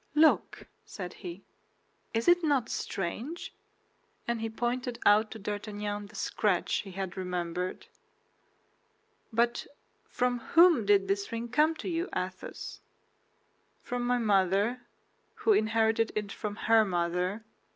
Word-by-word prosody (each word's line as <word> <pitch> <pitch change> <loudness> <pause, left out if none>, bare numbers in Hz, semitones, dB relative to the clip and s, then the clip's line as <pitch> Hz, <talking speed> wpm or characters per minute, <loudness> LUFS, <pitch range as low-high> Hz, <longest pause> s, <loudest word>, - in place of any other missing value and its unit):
"Look," 310 +1 +3 0.2
said 180 -3 -7
he, 180 0 -7 0.7
"is 225 0 -1
it 350 0 +5
not 280 -7 +2
strange?" 230 - -4 0.7
and 235 -1 -1
he 225 - -2
pointed 240 +2 -2
out 210 +1 +5
to 220 - -8
D'Artagnan 205 0 -4
the 210 - -17
scratch 200 -5 0
he 195 -2 -6
had 190 -1 -4
remembered. 180 -1 -3 1.5
"But 235 +1 +1 0.4
from 250 0 0 0.2
whom 330 - +7
did 200 -1 +4
this 200 +1 -1
ring 230 +1 -4
come 305 +6 +3
to - - -7
you, 345 0 -1
Athos?" 185 0 -5 1.0
"From 245 0 -3
my 245 0 +3
mother, 205 +2 +2 0.5
who 440 - +3
inherited 225 - +2
it 210 -2 -2
from 210 0 -4
her 225 -1 +6
mother. 180 +2 -1
220 Hz, 125 wpm, -30 LUFS, 195-245 Hz, 1.5 s, whom